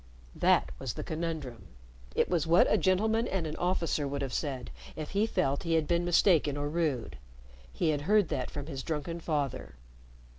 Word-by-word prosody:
That - - +3
was 130 -4 -4
the - - -4
conundrum. 155 - -4 0.5
It - - +3
was 165 -4 0
what 170 +2 +6
a - - +6
gentleman 220 +5 +2
and 190 -4 -1
an 155 0 -4
officer 170 -5 0
would 140 0 -3
have 135 - -4
said, 135 -5 -3 0.2
if 155 -1 -6
he 205 +3 +2
felt 140 -9 0
he 165 -1 0
had 160 -2 +1
been 170 0 +2
mistaken 165 -5 +3
or 145 0 -2
rude. 150 - -1 0.5
He 110 - 0
had 145 -2 0
heard 205 +3 +3
that 125 - -2
from 145 -1 -6
his 135 -4 -5
drunken 165 +3 -3
father. 140 - -2
155 Hz, 185 wpm, -30 LUFS, 140-170 Hz, 0.5 s, what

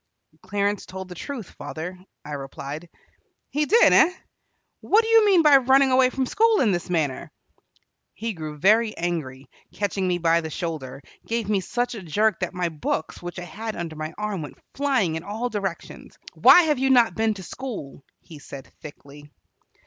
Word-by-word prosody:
"Clarence 200 +1 -2
told 190 0 -8
the - - -7
truth, 230 +3 -7
father," 180 +3 -7 0.3
I 150 - -8
replied. 140 +3 -7 0.6
"He 300 0 0
did, 460 +3 +5
eh? 355 - +6 0.7
What 440 +2 +3
do - - -4
you 450 -1 +5
mean 370 -5 +5
by 295 -2 +8
running 265 +1 +4
away 255 0 +5
from 260 0 -2
school 445 - +3
in 220 - +3
this 175 -1 -3
manner?" 155 -7 -2 0.8
He 225 +2 -4
grew 155 -3 -7
very 215 +7 +3
angry, 145 -6 -4 0.2
catching 200 -2 -2
me 180 -1 +1
by 170 0 +2
the 160 - -6
shoulder, 150 -5 -5 0.2
gave 230 -2 -2
me 205 -2 +2
such 240 +7 -2
a 220 - -7
jerk 205 +4 +1
that 185 0 -4
my 180 -1 -1
books, 155 0 -4
which 175 0 -7
I 175 - -5
had 220 +4 -6
under 165 -2 -5
my 155 +1 -5
arm, 210 -4 -3
went 150 - -9 0.2
flying 265 - +1
in - - -6
all 220 +5 -3
directions. 195 -6 -6 0.2
"Why 355 - +7
have 300 -4 +1
you 270 0 +1
not 240 -4 +5
been 220 -1 0
to 190 - -9
school?" 200 - -7 0.2
he 160 -4 -13
said 140 -1 -11
thickly. 145 0 -12
190 Hz, 180 wpm, -24 LUFS, 160-245 Hz, 0.8 s, by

